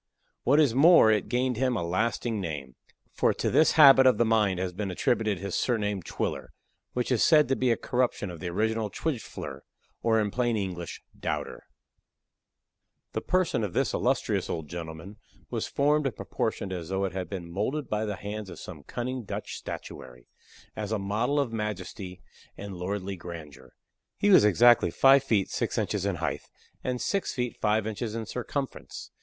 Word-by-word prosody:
What 145 +4 +4
is 145 -7 +4
more, 145 -3 +7
it 105 -2 0
gained 125 -1 0
him 130 -1 +1
a 90 - -2
lasting 110 +4 -1
name; 75 -7 -5 0.4
for - - +2
to - - -1
this 155 - +5
habit 135 -4 +8
of 130 - +5
the 120 - +3
mind 105 -4 +2
has 90 -1 -2
been 100 +2 -3
attributed 105 +2 0
his 100 +1 -5
surname 105 -5 0
of 85 - -14
Twiller; - - -4 0.4
which 125 +1 -1
is 125 - +3
said 155 -2 +5
to 135 - +3
be 130 -1 +1
a 115 - +2
corruption 125 -6 -1
of 85 - -9
the 90 - -5
original 110 +3 0
Twijfler, 140 +1 -4 0.4
or, 110 -1 +3
in 105 -1 0
plain 120 -1 0
English, 90 -4 -5 0.2
Doubter. - - -4 1.5
The - - -2
person 180 -10 +1
of 100 -4 -3
this - - +1
illustrious - - 0
old 80 -3 -3
gentleman 85 +5 -8 0.3
was 115 -3 -2
formed 145 +1 +2
and 120 - -4
proportioned 95 - -3
as 85 -3 -5
though 95 +1 0
it 95 - -4
had 90 -3 -4
been 85 -3 -6
molded 125 - -2
by 105 +1 -1
the 105 -1 -3
hands 105 +1 -6
of - - -9
some - - -9
cunning 125 +1 -4
Dutch - - -5
statuary, 60 -1 -8 0.5
as 105 -1 -4
a 110 - +1
model 110 +8 0
of 130 -5 -1
majesty 100 -3 -5 0.3
and 100 -1 -7
lordly 95 +2 -4
grandeur. 85 -5 -10 0.4
He 205 - +3
was 145 - +8
exactly 115 -1 +5
five 135 +10 +6
feet 110 -8 +1
six - - -2
inches - - -1
in - - 0
height, - - -2 0.4
and 125 -1 -2
six 200 +8 -1
feet 125 -2 -2
five 105 0 +2
inches 110 +1 -4
in 115 -1 -3
circumference. 130 +4 -5
110 Hz, 180 wpm, -28 LUFS, 95-125 Hz, 1.5 s, habit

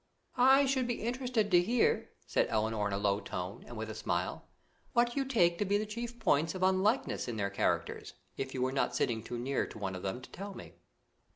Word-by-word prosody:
"I 265 +3 +7
should 260 -2 +1
be 240 -3 -2
interested 240 -3 0
to 175 -1 +7
hear," 230 +6 +2 0.2
said - - +1
Elinor 110 -1 0
in 100 - -3
a - - 0
low 100 0 +1
tone, 90 0 -5
and 120 - -8
with 110 +1 -4
a - - -5
smile, - - -2 0.5
"what 240 0 +3
you 275 - +1
take 175 -11 +2
to - - +3
be 200 +1 +2
the 215 - -1
chief 235 +3 -5
points 160 -3 +2
of 185 - -2
unlikeness 190 - +2
in 120 -2 -3
their 100 -1 -1
characters, 100 - -1 0.2
if 135 0 -4
you 130 - 0
were 130 - +1
not 130 -2 0
sitting 115 -2 0
too 120 +2 -5
near 130 +3 -1
to - - -10
one 95 -3 -3
of 90 - -6
them 95 +5 -3
to 130 - -13
tell 200 +1 -7
me." - - -10
175 Hz, 225 wpm, -32 LUFS, -, 0.5 s, I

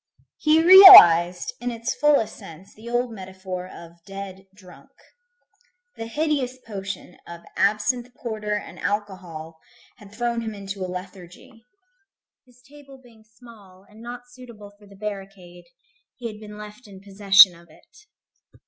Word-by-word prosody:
He 315 +1 +2
realized 180 - +8
in 245 - -4
its 230 +1 -5
fullest 285 -4 0
sense 165 +4 -15
the 225 +2 -13
old 240 0 -2
metaphor 190 -2 -9
of 170 -1 -15
"dead 195 -1 -10
drunk." 185 -3 -18 1.1
The 225 - -8
hideous 275 -1 -3
potion 195 -4 -9
of 170 0 -11
absinthe 215 +5 -1
porter 215 -3 -5
and 210 - -9
alcohol 180 -6 -6 0.4
had 205 -4 -17
thrown 235 +1 -4
him 220 -2 -7
into 195 -1 -8
a 185 - -6
lethargy. 185 +6 -12 0.8
His 250 0 -25
table 280 -1 -17
being 235 -4 -22
small, 215 -4 -19
and 215 +2 -18
not 240 +1 -9
suitable 235 -5 -15
for 205 0 -22
the 200 - -18
barricade, 195 -4 -10 0.5
he 245 - -13
had 215 -2 -7
been 210 -1 -12
left 210 +2 -13
in 195 -2 -14
possession 195 -1 +4
of 170 0 -20
it. 425 - -23
210 Hz, 140 wpm, -22 LUFS, 190-240 Hz, 1.1 s, realized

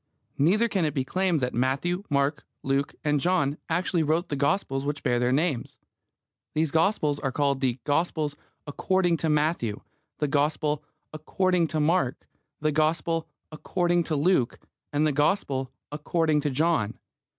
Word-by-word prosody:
Neither 200 +11 +4
can 195 -6 0
it 150 -2 -1
be 135 -2 0
claimed 185 0 +1
that 125 0 -1
Matthew, 135 +9 0
Mark, 140 +1 +1 0.2
Luke 135 +1 0
and 150 -1 +2
John 150 -3 +1
actually 175 +1 +1
wrote 160 +3 0
the 145 - -1
Gospels 140 -2 0
which 145 0 -3
bear 125 -3 +2
their 125 +1 +1
names. 145 -3 0 0.8
These 155 -1 +1
Gospels 160 -4 +2
are 135 - -2
called 140 0 0
the 130 -2 +1
Gospel 155 0 0 0.3
"according 175 +3 +1
to 160 - -1
Matthew," 150 -8 0 0.4
the 150 - 0
Gospel 150 +1 0 0.3
"according 180 +2 +1
to 155 0 -2
Mark," 150 -4 +1 0.3
the 155 0 +1
Gospel 160 +2 0 0.2
"according 175 +2 0
to 155 - -1
Luke," 145 -4 +2 0.3
and 145 +1 +1
the 155 - +3
Gospel 140 -4 0 0.2
"according 155 +1 +1
to 145 - 0
John." 145 -6 0
150 Hz, 150 wpm, -26 LUFS, 140-170 Hz, 0.8 s, Neither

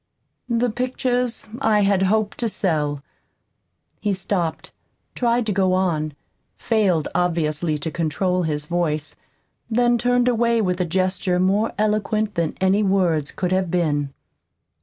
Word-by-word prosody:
The 235 0 +1
pictures 250 -1 -1
I 220 -5 +3
had 195 -1 +2
hoped 205 +2 +1
to 235 - 0
sell 150 -8 -1 1.0
"He 205 -2 0
stopped, 175 -4 -2 0.4
tried 240 -1 +1
to 215 - -1
go 190 -1 +2
on, 160 -5 0 0.4
failed 200 -9 +1
obviously 165 -3 0
to 155 +2 -4
control 180 +3 0
his 150 -3 -2
voice; 155 -2 -2 0.5
then 240 +1 +2
turned 245 +1 +2
away 235 -1 +2
with 180 -3 0
a - - +1
gesture 185 +1 0
more 195 +4 +2
eloquent 215 0 0
than 170 -4 -1
any 190 +2 +3
words 180 -7 +1
could 180 -1 -3
have 185 -1 +1
been. 150 -5 0
190 Hz, 135 wpm, -22 LUFS, 165-220 Hz, 1.0 s, I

